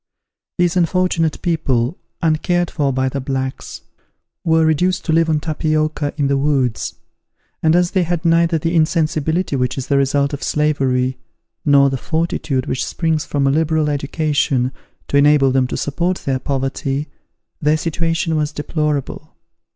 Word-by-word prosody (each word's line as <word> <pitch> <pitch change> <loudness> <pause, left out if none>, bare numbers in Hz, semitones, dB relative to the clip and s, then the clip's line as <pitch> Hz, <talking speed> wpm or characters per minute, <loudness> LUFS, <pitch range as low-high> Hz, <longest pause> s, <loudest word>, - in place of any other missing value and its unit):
These 175 -1 +2
unfortunate 175 -2 +1
people, 140 -5 0 0.3
uncared 175 +2 +1
for 145 -4 0
by 130 0 0
the 135 +1 -3
blacks, 130 0 -4 0.6
were 160 -1 +3
reduced 180 +4 +1
to 160 - +1
live 165 0 +3
on 155 -1 +2
tapioca 155 -1 -1
in 145 - +1
the 140 0 +2
woods; 135 -5 0 0.7
and 160 +1 +3
as 175 0 +2
they 190 - +2
had 175 0 -2
neither 165 0 +3
the 165 +2 -1
insensibility 160 0 +1
which 125 0 -1
is 130 - -3
the 140 - +3
result 140 +1 +1
of 145 - -4
slavery, 130 -4 0 0.4
nor 140 -2 +5
the 135 - -1
fortitude 160 -3 -1
which 130 - -2
springs 160 -3 -1
from 140 -1 -1
a 135 - +3
liberal 155 0 +1
education, 140 -3 0 0.4
to 140 - +1
enable 140 -2 +5
them 130 -1 +2
to - - -4
support 175 +6 -1
their 130 -1 0
poverty, 135 +1 -2 0.5
their 150 +1 +3
situation 165 0 -1
was 150 0 0
deplorable. 150 -2 -3
150 Hz, 150 wpm, -18 LUFS, 135-165 Hz, 0.7 s, nor